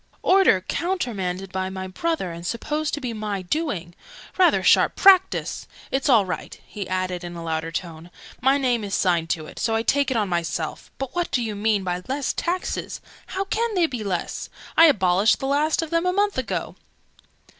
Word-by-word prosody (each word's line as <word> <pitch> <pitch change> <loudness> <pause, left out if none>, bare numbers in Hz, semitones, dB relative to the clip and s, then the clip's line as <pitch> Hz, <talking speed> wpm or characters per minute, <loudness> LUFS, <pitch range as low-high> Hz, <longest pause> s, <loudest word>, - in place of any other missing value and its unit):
"Order 370 - +5
countermanded 195 - -2
by 190 0 -2
my 190 0 -5
brother, 190 - -2
and 170 0 -8
supposed 295 - -2
to - - -6
be 250 -4 -4
my 210 -3 -3
doing! 180 - -2 0.4
Rather 370 -2 +4
sharp - - +4
practice! 380 -1 +4 0.2
It's 275 +3 0
all 225 -6 +5
right!" 180 -4 -6
he 200 -3 -7
added 185 -1 -2
in 175 0 -7
a 170 - -7
louder 160 0 -2
tone. 165 0 -6 0.3
"My 265 +3 +4
name 245 -5 +1
is 200 -1 -2
signed 170 -3 +1
to 155 -2 -1
it: - - -10
so 225 0 0
I 225 - 0
take 280 +2 +2
it 260 - 0
on 210 -2 +1
myself. 170 -3 -3
But 270 -1 -5
what 350 -1 -1
do 245 -2 0
they 215 - -3
mean 205 -1 +1
by 180 -1 -2
'Less 270 +1 -1
Taxes'? 360 +2 -3 0.3
How 385 - -2
can 445 +2 -1
they 355 -2 +4
be 250 -8 -4
less? 185 -4 -3 0.3
I 330 - +8
abolished 200 - +4
the - - -5
last 295 +4 +1
of 320 - -7
them 335 +2 +1
a 360 - +2
month 405 +1 +1
ago!" 255 - -3
220 Hz, 195 wpm, -23 LUFS, 180-305 Hz, 0.4 s, I